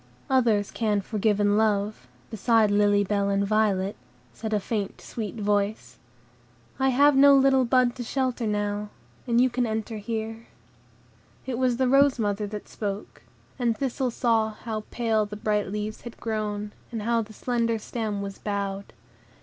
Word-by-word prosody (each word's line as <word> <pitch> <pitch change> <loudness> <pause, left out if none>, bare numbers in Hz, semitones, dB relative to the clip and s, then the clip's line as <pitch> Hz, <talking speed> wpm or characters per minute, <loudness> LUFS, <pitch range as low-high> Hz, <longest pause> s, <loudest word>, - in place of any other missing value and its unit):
"Others 225 -6 +2
can 210 -3 0
forgive 210 +1 0
and 205 0 +3
love, 205 -9 0 0.2
beside 220 0 +3
Lily 205 0 +4
Bell 200 0 0
and 200 0 +1
Violet," 200 -2 +1 0.4
said 220 -1 -5
a 210 - +2
faint, 205 -1 -3
sweet 220 -2 -6
voice; 205 - -1 0.8
"I 265 0 +3
have 285 +3 +5
no 280 +1 +7
little 265 -1 +4
bud 250 0 +3
to 245 - -4
shelter 255 -1 -1
now, 205 0 -2 0.4
and 235 0 +3
you 255 - +5
can 250 -1 -1
enter 220 0 -3
here." 225 +1 -5 1.0
It 255 -2 -3
was 250 -2 +2
the 260 0 +2
rose 275 +1 +4
mother 205 -2 -1
that 210 0 -7
spoke, 205 -1 -5 0.4
and 235 -3 +1
Thistle 265 0 -1
saw 225 -2 +1
how 215 -1 -5
pale 220 -3 0
the 210 - -7
bright 210 -1 0
leaves 210 +2 -4
had 235 - -9
grown, 210 -2 -3 0.2
and 225 -3 -4
how 230 +1 +2
the 215 0 -9
slender 230 0 0
stem 215 -2 -4
was 195 -1 -7
bowed. 200 -1 -4
220 Hz, 160 wpm, -26 LUFS, 205-240 Hz, 1.0 s, no